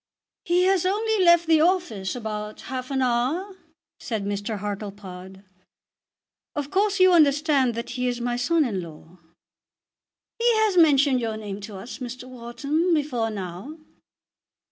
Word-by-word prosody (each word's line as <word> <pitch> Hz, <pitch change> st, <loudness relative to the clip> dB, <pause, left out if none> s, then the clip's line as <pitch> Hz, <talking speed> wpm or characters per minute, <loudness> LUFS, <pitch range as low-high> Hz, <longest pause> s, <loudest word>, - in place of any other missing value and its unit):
"He 350 Hz, +1 st, +3 dB
has 380 Hz, -1 st, +3 dB
only 420 Hz, +2 st, +1 dB
left 345 Hz, -1 st, +5 dB
the 320 Hz, -1 st, +4 dB
office 320 Hz, -, 0 dB
about 215 Hz, -2 st, -5 dB
half 255 Hz, -1 st, -6 dB
an 265 Hz, -1 st, 0 dB
hour," 265 Hz, +11 st, -1 dB, 0.4 s
said 220 Hz, -4 st, -4 dB
Mr. 205 Hz, +2 st, -3 dB
Hartlepod. 195 Hz, -2 st, -7 dB, 1.1 s
"Of 290 Hz, -1 st, -4 dB
course 400 Hz, 0 st, +1 dB
you 370 Hz, 0 st, +6 dB
understand 290 Hz, -5 st, +3 dB
that 235 Hz, -, -5 dB
he 250 Hz, 0 st, -2 dB
is 245 Hz, -1 st, -2 dB
my 240 Hz, 0 st, -1 dB
son 300 Hz, +6 st, +2 dB
in 200 Hz, -7 st, -2 dB
law." 165 Hz, +1 st, -13 dB, 1.2 s
"He 475 Hz, +1 st, +4 dB
has 435 Hz, -3 st, +2 dB
mentioned 285 Hz, -5 st, +5 dB
your 225 Hz, -2 st, -3 dB
name 205 Hz, -2 st, -6 dB
to 205 Hz, 0 st, -8 dB
us, 205 Hz, +6 st, -9 dB
Mr. 250 Hz, 0 st, -7 dB
Wharton, 280 Hz, +8 st, -1 dB
before 255 Hz, -7 st, -1 dB
now." 195 Hz, -, -7 dB
255 Hz, 145 wpm, -24 LUFS, 210-330 Hz, 1.2 s, you